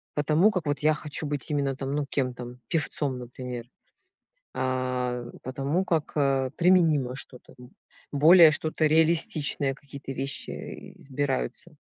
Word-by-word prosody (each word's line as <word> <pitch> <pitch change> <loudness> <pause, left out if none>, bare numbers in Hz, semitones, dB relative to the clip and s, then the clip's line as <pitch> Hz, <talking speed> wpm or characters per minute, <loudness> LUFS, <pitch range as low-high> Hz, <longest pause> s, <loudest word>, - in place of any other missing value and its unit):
по 150 - 0
тому 160 +8 +4
как 180 -6 -2
вот 145 0 -1
я 155 +1 +3
хочу 150 0 -5
быть 145 +1 -4
именно 140 -2 0
там, 135 +1 -3
ну, 145 -1 -1
кем 130 -3 -1
там, 125 0 -9
певцом, 145 -5 -1
например, 125 -1 -7 0.9
а 125 -1 -1 0.2
по 130 - -6
тому, 140 +8 0
как, 160 -4 -1
э, 135 -2 +2
применимо 160 -8 +3
что-то, 130 -2 -10
м, 125 +1 -14 0.4
более 160 +3 +8
что-то 155 +1 0
реалистичное, 155 -3 +2
какие-то 140 -1 -9
вещи 135 +1 -6
избираются. 135 - -3
140 Hz, 140 wpm, -27 LUFS, 130-155 Hz, 0.9 s, более